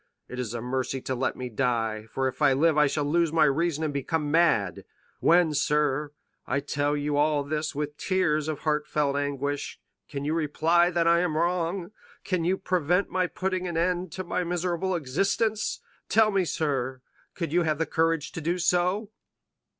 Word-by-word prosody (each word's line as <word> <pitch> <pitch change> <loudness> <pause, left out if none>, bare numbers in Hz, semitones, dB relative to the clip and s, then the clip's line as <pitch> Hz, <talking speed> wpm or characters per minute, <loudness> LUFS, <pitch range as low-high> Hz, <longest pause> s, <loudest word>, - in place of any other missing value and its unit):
It 125 - -7
is 120 -2 -3
a 115 - -4
mercy 130 +1 -2
to 130 - -3
let 130 +1 -1
me 125 - -5
die, 115 -3 -1
for 130 +3 -1
if 130 - -6
I 140 - +5
live 155 +4 +3
I 150 -1 +5
shall 145 +1 -1
lose 165 +2 +2
my 165 -1 +4
reason 160 +2 +1
and 155 -2 -1
become 145 +2 -1
mad. 155 - +2 0.4
When, 170 -1 +4
sir, 150 0 +1 0.4
I 140 - +1
tell 145 +1 -1
you 145 0 -1
all 150 0 +2
this 150 +1 -3
with 150 0 -3
tears 160 -4 +1
of 155 -2 -3
heartfelt 150 -2 0
anguish, 145 0 -2 0.3
can 140 -1 -5
you 150 - 0
reply 165 +2 +2
that 170 -1 +1
I 170 0 +5
am 170 -3 0
wrong, 175 +2 -1 0.3
can 180 -3 -1
you 185 +3 +1
prevent 180 +1 +1
my 185 -1 +1
putting 185 0 -2
an 170 -2 -3
end 180 +1 0
to 185 - -4
my 180 0 -2
miserable 180 +1 -1
existence? 195 - 0 0.3
Tell 220 0 +4
me, 195 -2 +1
sir, 135 -6 -2 0.3
could 165 -4 -3
you 175 - +4
have 155 -3 0
the 165 - 0
courage 165 -2 0
to 165 - -6
do 170 +4 0
so?" 180 +4 +1
155 Hz, 185 wpm, -27 LUFS, 145-175 Hz, 0.4 s, I